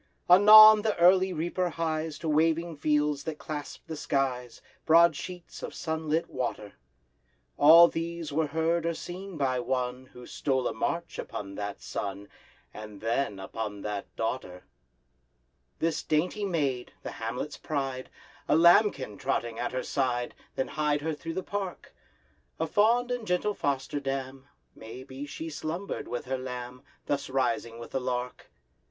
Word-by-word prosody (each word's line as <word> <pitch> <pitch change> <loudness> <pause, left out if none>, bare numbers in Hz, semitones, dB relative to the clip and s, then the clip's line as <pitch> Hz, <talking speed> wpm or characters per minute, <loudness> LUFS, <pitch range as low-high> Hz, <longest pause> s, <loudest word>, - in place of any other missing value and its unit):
Anon 215 +3 +10
the 215 -1 -1
early 185 +2 +5
reaper 175 +2 -1
hies 160 -2 -2
To 165 - -6
waving 165 +2 +1
fields 150 -1 +1
that 160 -2 -4
clasp 150 -2 -7
the 160 - -6
skies, 130 -4 -2 0.2
Broad 165 0 +6
sheets 175 +3 -8
of - - -6
sunlit 160 0 -1
water. 120 -5 -4 0.8
All 165 +3 +9
these 165 -2 -4
were 155 +1 +1
heard 160 +2 0
or 170 - -1
seen 185 +1 -7
by 130 -3 0
one 125 +1 -2
Who 125 -1 -13
stole 130 -1 -1
a - - -2
march 170 +9 -3
upon 100 -1 -6
that 100 0 -6
sun, 100 0 -5 0.4
And 105 -1 -9
then—upon 105 -3 -3
that 105 -1 -4
Daughter! 110 -6 -4 1.1
This 160 -1 -1
dainty 180 +7 0
maid, 140 -9 -1
the - - -5
hamlet's - - -5
pride, 135 -4 -3 0.4
A - - +3
lambkin 165 - +4
trotting 120 -4 -2
at 120 - -2
her 130 0 -3
side, 125 -3 -1 0.2
Then 130 - -2
hied 150 -1 0
her 160 +1 -2
through 165 +2 -6
the 185 - -2
park; 195 -3 -5 0.7
A 160 - +1
fond 230 +8 +2
and 245 -3 -3
gentle 180 +4 +1
foster 140 -3 -2
dam— 135 0 -5 0.3
May 115 +3 -10
be 135 +2 -8
she 160 +3 -6
slumbered 165 +6 -4
with 120 +1 -4
her 130 0 -2
lamb, 125 -1 -7 0.2
Thus 140 -1 -2
rising 115 -3 -1
with 115 0 -10
the 135 - -2
lark! 125 0 -4
145 Hz, 150 wpm, -28 LUFS, 125-170 Hz, 1.1 s, Anon